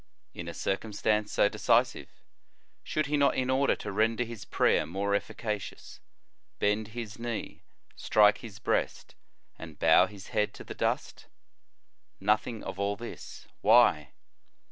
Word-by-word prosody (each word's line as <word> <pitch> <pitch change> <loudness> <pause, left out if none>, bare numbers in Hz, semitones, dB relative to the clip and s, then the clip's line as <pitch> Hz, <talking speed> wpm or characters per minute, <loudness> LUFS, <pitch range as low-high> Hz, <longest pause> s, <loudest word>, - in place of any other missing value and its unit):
In 85 - -7
a 85 - -5
circumstance 105 +1 -1
so - - +4
decisive, 115 +4 +1 0.7
should 155 - -1
he 150 +1 0
not, 140 -1 +3
in 130 0 0
order 135 +1 +2
to - - -6
render 110 +4 +1
his 115 -3 -8
prayer - - +2
more 100 +4 -2
efficacious, 105 0 -4 0.6
bend 105 +1 0
his 110 -2 -6
knee, 115 -2 -5 0.3
strike 105 -1 +4
his 110 -4 -10
breast, 110 - -2 0.5
and 80 -2 -10
bow 80 +3 +5
his 100 -1 -12
head 105 - 0
to - - -9
the - - -8
dust? - - -2 0.9
Nothing 110 +2 0
of 95 - -7
all 100 0 0
this. 120 +2 -10
Why? 100 - +4
105 Hz, 140 wpm, -29 LUFS, 100-115 Hz, 0.9 s, bow